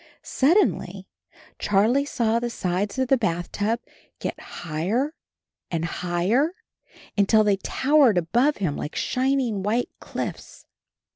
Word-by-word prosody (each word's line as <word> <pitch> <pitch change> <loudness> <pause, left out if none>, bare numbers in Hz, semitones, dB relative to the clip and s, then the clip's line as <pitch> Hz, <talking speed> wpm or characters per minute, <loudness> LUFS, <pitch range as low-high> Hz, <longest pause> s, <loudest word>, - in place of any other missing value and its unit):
Suddenly 335 +10 +1 0.5
Charlie 220 +8 +2
saw 230 -5 +1
the 240 0 -2
sides 200 0 -2
of 260 0 +1
the 265 0 +3
bath 175 -5 -1
tub 225 +3 -1 0.4
get - - -4
higher 190 - -2 0.6
and 165 -1 -1
higher, 180 - 0 0.6
until 215 +2 +4
they 205 -2 +2
tow 275 +9 0
ered 240 -10 +6
above 240 - +2
him 175 -8 -1
like 150 - -5
shining 255 -5 0
white 220 +5 0
cliffs. - - -6
220 Hz, 125 wpm, -24 LUFS, 185-260 Hz, 0.6 s, ered